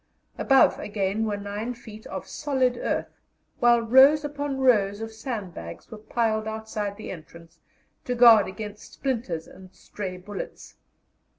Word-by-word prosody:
Above, 270 -1 +4
again, 205 +1 -1
were 205 -1 -1
9 205 +4 -4
feet 220 -2 -12
of - - -6
solid 260 -4 0
earth, - - -3 0.4
while 240 -1 +5
rows 265 +6 +6
upon 290 -1 -3
rows 210 -6 +3
of 225 0 -5
sandbags 200 - -7
were 220 - -7
piled 220 -1 -1
outside 220 -2 -4
the 215 - -7
entrance 170 -1 -12 0.4
to 250 - -2
guard 230 -4 +7
against 210 +2 -8
splinters 225 - -3
and 185 -1 -14
stray 185 0 -7
bullets. 195 +2 -8
220 Hz, 135 wpm, -25 LUFS, 200-245 Hz, 0.4 s, guard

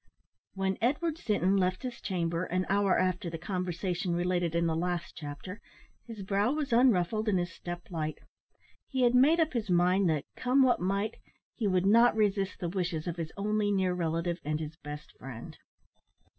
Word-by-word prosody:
When 190 0 -1
Edward 300 +7 0
Sinton 200 - +1
left 185 +2 0
his 250 -2 -5
chamber, 170 -2 -1
an 185 +1 -1
hour 200 -1 +3
after 185 0 0
the 165 - -5
conversation 180 0 -2
related 175 -1 0
in 170 0 +2
the 165 -1 +1
last 175 0 -2
chapter, 155 +7 -8 0.5
his 220 -4 -7
brow 200 +6 +1
was 295 -5 -2
unruffled 220 -3 +3
and 195 - +2
his 175 0 -2
step 175 0 -6
light. 155 -2 -3 0.7
He 260 -2 0
had 240 0 +4
made 285 +7 +5
up 320 -2 +2
his 225 -4 -2
mind 180 +1 +3
that, 150 -3 0
come 260 +2 +3
what 250 -7 +3
might, 200 +4 -1 0.4
he 220 - -1
would 185 -1 +2
not 230 +3 +5
resist 205 -2 +1
the 175 - -2
wishes 170 -4 -2
of 175 -1 -4
his 165 -1 -4
only 210 0 0
near 190 -2 +1
relative 170 0 -1
and 150 +1 -1
his 155 0 -6
best 150 -2 -9
friend. 125 -3 -8
185 Hz, 180 wpm, -30 LUFS, 170-215 Hz, 0.7 s, made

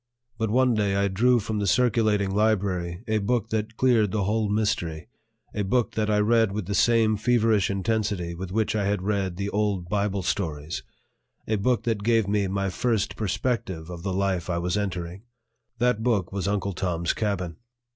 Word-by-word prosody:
But 110 -1 0
one 125 +2 +3
day 100 -3 +1
I 100 0 +2
drew 120 +6 +3
from 110 0 -3
the 100 - -1
circulating 110 -3 +2
library 95 -4 0
a 110 0 +1
book 110 +2 0
that 110 +1 -3
cleared 120 -5 +3
the 105 -2 0
whole 105 +2 0
mystery, 100 -5 -1 0.4
a 105 - -2
book 115 +5 +1
that 110 -1 -1
I 105 - +3
read 110 0 +3
with 105 -2 -3
the 100 - -3
same 110 +1 +3
feverish 110 -3 +2
intensity 100 -3 -1
with 90 +2 -6
which 110 +1 0
I 105 -2 0
had 100 -2 0
read 95 -3 -1
the 100 +1 -3
old 100 -4 -1
Bible 100 -2 0
stories, 80 -7 -2 0.7
a 110 - +1
book 120 +4 +1
that 115 -3 -1
gave 115 -1 +2
me 100 -1 +1
my 100 0 -1
first 115 0 0
perspective 100 -5 -2
of 85 -1 -7
the 95 - -2
life 95 -2 -1
I 85 - 0
was 90 +2 -1
entering; 95 -3 -3 0.6
that 120 -2 +1
book 110 -7 0
was 100 -1 -2
Uncle 100 -1 -1
Tom's 85 -2 -1
Cabin. 95 -6 -2
100 Hz, 185 wpm, -25 LUFS, 95-110 Hz, 0.7 s, one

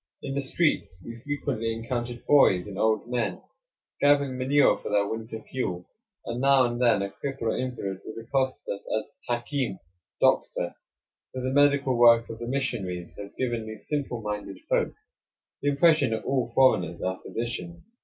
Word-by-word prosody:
In 135 - -3
the 140 - 0
streets 135 - 0
we 115 - -7
frequently 135 -5 -2
encountered 120 +1 -4
boys 95 -11 +5
and 100 -2 -8
old 110 +1 +2
men 120 -2 -1 0.6
gathering 140 -2 +3
manure 135 +3 +4
for - - -6
their 100 -1 +2
winter 110 0 -5
fuel; 90 -9 -4 0.4
and 120 +1 -3
now 135 -1 +5
and 120 0 -2
then 115 -5 +4
a 100 - -3
cripple 135 +1 -5
or 110 - +1
invalid 115 -7 -3
would 110 - -7
accost 130 +3 -1
us 100 - -4 0.2
as - - -12 0.2
"Hakim" 120 -2 -1 0.4
("Doctor"), 85 - +2 0.6
for 130 - -4
the 130 - -1
medical 140 -2 +4
work 115 -1 +6
of 115 - -8
the 120 - -5
missionaries 105 -10 -3
has 100 -1 -9
given 120 -3 -2
these 110 -1 -9
simple 140 -6 -2
minded 105 -2 -4
folk - - +1 0.7
the 145 - +2
impression 145 -2 +4
that 110 0 -2
all 130 -3 +1
foreigners 95 -10 +3
are 95 0 -2
physicians. 150 +9 -5
120 Hz, 165 wpm, -27 LUFS, 110-135 Hz, 0.7 s, work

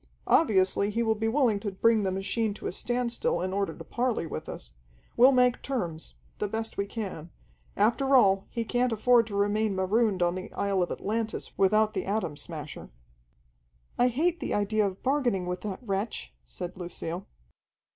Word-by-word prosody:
Obviously 200 - +3
he 230 +3 0
will 220 -1 +2
be 220 +1 -2
willing 230 -4 +2
to 205 - -3
bring 220 +3 +3
the 190 -2 0
machine 200 +3 -1
to - - -10
a - - -1
standstill 245 - -1
in 185 +1 -2
order 200 0 -1
to - - -8
parley 240 -7 -1
with - - -6
us. - - -7 0.4
We'll 255 +3 +7
make 250 -2 +3
terms 175 -12 -3 0.2
the 210 - 0
best 225 +2 -4
we 200 - -2
can. 195 -7 -6 0.5
After 265 +6 +3
all, 195 -6 +4
he 230 -2 -3
can't 245 +2 +1
afford 230 +1 +4
to 205 - -6
remain 205 0 +1
marooned 190 0 +2
on 175 0 +2
the 185 +1 -6
isle 200 -2 0
of 175 - 0
Atlantis 220 +1 -3
without 215 +2 +3
the - - -3
Atom 195 -7 -1
Smasher." 150 -1 -8 1.1
"I 245 - +5
hate 320 +8 +1
the - - -2
idea 205 0 +1
of 190 -1 -7
bargaining 255 -9 +1
with 180 0 -3
that 205 -3 -4
wretch," 195 - -3
said 175 - -7
Lucille. 175 0 -5
210 Hz, 175 wpm, -28 LUFS, 190-235 Hz, 1.1 s, We'll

